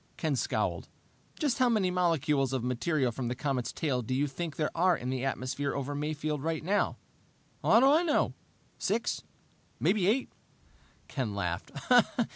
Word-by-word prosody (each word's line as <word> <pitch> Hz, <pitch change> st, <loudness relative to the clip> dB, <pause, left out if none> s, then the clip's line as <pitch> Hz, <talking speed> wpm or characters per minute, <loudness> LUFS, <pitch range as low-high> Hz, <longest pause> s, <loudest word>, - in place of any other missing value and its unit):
Ken -, -, 0 dB
scowled. -, -, -1 dB, 0.5 s
"Just 285 Hz, -6 st, 0 dB
how 255 Hz, -1 st, +4 dB
many 205 Hz, -6 st, +2 dB
molecules 150 Hz, -7 st, +1 dB
of 130 Hz, -3 st, -1 dB
material 125 Hz, +2 st, 0 dB
from 120 Hz, +1 st, -4 dB
the 125 Hz, -, -2 dB
comet's 130 Hz, -3 st, -2 dB
tail 135 Hz, -6 st, -1 dB
do 125 Hz, +2 st, -2 dB
you 140 Hz, +2 st, +2 dB
think 150 Hz, +3 st, -4 dB
there 155 Hz, -, -1 dB
are 175 Hz, 0 st, +3 dB
in 125 Hz, +1 st, -4 dB
the 130 Hz, -1 st, -2 dB
atmosphere 135 Hz, +1 st, -2 dB
over 140 Hz, +1 st, -3 dB
Mayfield 150 Hz, 0 st, -2 dB
right 160 Hz, +1 st, -2 dB
now?" 200 Hz, +5 st, +1 dB, 0.6 s
"How 225 Hz, -, +5 dB
do -, -, +6 dB
I 295 Hz, +4 st, +6 dB
know? 325 Hz, -4 st, +1 dB, 0.5 s
Six 220 Hz, +3 st, 0 dB, 0.6 s
maybe 195 Hz, -4 st, +2 dB
eight." 245 Hz, +6 st, +1 dB, 0.8 s
Ken 120 Hz, -8 st, -3 dB
laughed. 90 Hz, -3 st, -2 dB
150 Hz, 160 wpm, -30 LUFS, 130-180 Hz, 0.8 s, do